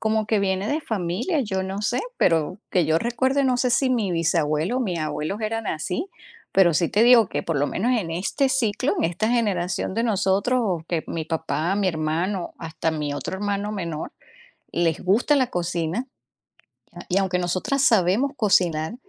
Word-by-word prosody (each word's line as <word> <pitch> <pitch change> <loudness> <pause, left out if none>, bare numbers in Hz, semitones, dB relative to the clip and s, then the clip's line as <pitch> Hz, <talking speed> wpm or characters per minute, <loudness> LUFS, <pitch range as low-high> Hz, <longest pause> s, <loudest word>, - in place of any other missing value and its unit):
Como 220 -1 0
que 215 -1 +2
viene 195 0 0
de 300 +2 0
familia, 220 - -1
yo 190 -6 -2
no 195 +2 -4
sé, 240 +4 0 0.2
pero 165 +3 +1
que 180 -3 +2
yo 160 +1 +2
recuerde, 260 +6 0
no 255 -2 +2
sé 250 0 +1
si 255 +2 +2
mi 215 -7 0
bisabuelo 165 +3 +1
o - - 0
mis 185 -8 -1
abuelos 155 +6 -3
eran 225 0 -2
así, 220 - -2 0.5
pero 185 -3 +5
sí 165 +2 +1
te 210 - +2
digo 235 -2 +7
que - - -3
por 165 -4 -1
lo 145 - +2
menos 230 - 0
en 170 -6 -4
este 200 - 0
ciclo, 235 -6 0
en - - 0
esta 175 +7 0
generación 190 -6 0
de 230 - 0
nosotros 205 +3 +1
o 180 -7 -1
que 165 -3 -1
mi 165 -1 -3
papá, 160 +2 -1
mi 200 -1 +1
hermano, 170 +3 -2
hasta 160 0 -3
mi 150 -2 -3
otro 145 - -4
hermano 205 +1 -2
menor, 170 -6 -4 0.6
les 170 -1 0
gusta 225 +10 +3
la 260 - +3
cocina, 175 +5 -2 1.0
y 185 - 0
aunque 190 -2 0
nosotras 185 +10 0
sabemos 225 +4 +3
cocinar, 180 - +1
190 Hz, 180 wpm, -23 LUFS, 170-230 Hz, 1.0 s, digo